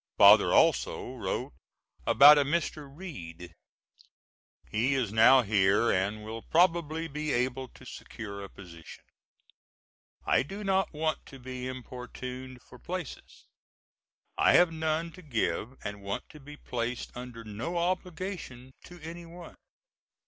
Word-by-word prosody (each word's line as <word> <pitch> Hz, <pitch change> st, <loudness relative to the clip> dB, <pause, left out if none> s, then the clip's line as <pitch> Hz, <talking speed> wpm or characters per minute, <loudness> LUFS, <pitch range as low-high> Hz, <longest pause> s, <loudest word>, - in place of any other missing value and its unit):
Father -, -, +8 dB
also -, -, +2 dB
wrote -, -, -4 dB, 0.5 s
about 145 Hz, +2 st, +8 dB
a -, -, +4 dB
Mr. 150 Hz, -1 st, -2 dB
Reed. 90 Hz, -, -9 dB, 1.2 s
He 125 Hz, +6 st, +1 dB
is 120 Hz, -6 st, -1 dB
now 125 Hz, +4 st, +7 dB
here 100 Hz, +1 st, +3 dB
and 100 Hz, +3 st, -1 dB
will 115 Hz, +1 st, -6 dB
probably 165 Hz, -1 st, +1 dB
be 150 Hz, 0 st, -3 dB
able 130 Hz, +1 st, -1 dB
to -, -, -17 dB
secure 100 Hz, -2 st, -8 dB
a 100 Hz, -, -8 dB
position. 85 Hz, -4 st, -13 dB, 1.2 s
I -, -, +3 dB
do 195 Hz, +10 st, -7 dB
not 195 Hz, -1 st, +1 dB
want 155 Hz, 0 st, -2 dB
to 135 Hz, -, -11 dB
be 130 Hz, 0 st, -6 dB
importuned 130 Hz, 0 st, -8 dB
for 125 Hz, -, -15 dB
places. 180 Hz, -5 st, -7 dB, 0.9 s
I -, -, +5 dB
have 175 Hz, -1 st, +6 dB
none 160 Hz, +1 st, -1 dB
to 185 Hz, -, -13 dB
give 115 Hz, -, -2 dB
and 105 Hz, 0 st, -6 dB
want 100 Hz, 0 st, -4 dB
to 150 Hz, -, -13 dB
be 150 Hz, +1 st, -12 dB
placed 120 Hz, -2 st, -4 dB
under 120 Hz, -2 st, -8 dB
no 115 Hz, +11 st, -4 dB
obligation 175 Hz, -7 st, -3 dB
to 175 Hz, 0 st, -13 dB
any 170 Hz, +2 st, -8 dB
one. 175 Hz, 0 st, -11 dB
130 Hz, 135 wpm, -29 LUFS, 115-165 Hz, 1.2 s, Father